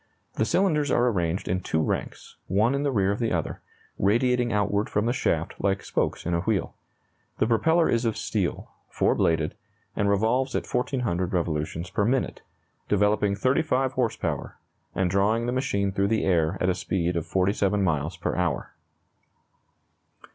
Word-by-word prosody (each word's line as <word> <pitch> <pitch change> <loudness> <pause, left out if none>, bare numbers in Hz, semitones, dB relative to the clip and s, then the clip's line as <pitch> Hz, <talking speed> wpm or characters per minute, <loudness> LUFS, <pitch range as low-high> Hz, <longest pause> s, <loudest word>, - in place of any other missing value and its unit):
The 110 - 0
cylinders 155 - +2
are 125 -1 +3
arranged 90 -4 -1
in 90 +1 0
two 80 - -1
ranks, 80 - -3
one 110 +7 +2
in 140 - 0
the 145 -1 0
rear 100 -5 +2
of 100 - -2
the 115 -2 0
other, 85 -3 -2 0.4
radiating 120 +4 +2
outward 105 0 0
from 105 +1 0
the 120 - +1
shaft 85 -9 -1
like 100 0 0
spokes - - -1
in 85 - -1
a 85 - +2
wheel. 100 +2 -1 0.6
The - - +2
propeller 160 +9 +3
is 115 +1 +1
of 115 -2 0
steel, - - -2 0.2
4 - - +2
bladed, 80 -2 +1 0.4
and 100 0 +1
revolves 115 +6 +1
at - - -1
1,400 120 -8 -1
revolutions 85 0 -2
per 100 - +1
minute, 125 +5 0 0.5
developing 105 0 +2
35 130 +2 +1
horse 125 -4 0
power, - - -4 0.4
and 95 0 +1
drawing 100 +5 +1
the 120 - -1
machine 100 -7 0
through 100 +1 +1
the 110 +1 +1
air 85 -1 +2
at 90 - +1
a 95 - +3
speed 90 -1 -1
of 85 - -2
47 100 +1 +1
miles 80 0 -1
per 85 - -2
hour. 90 -2 -1
100 Hz, 170 wpm, -26 LUFS, 90-120 Hz, 0.6 s, are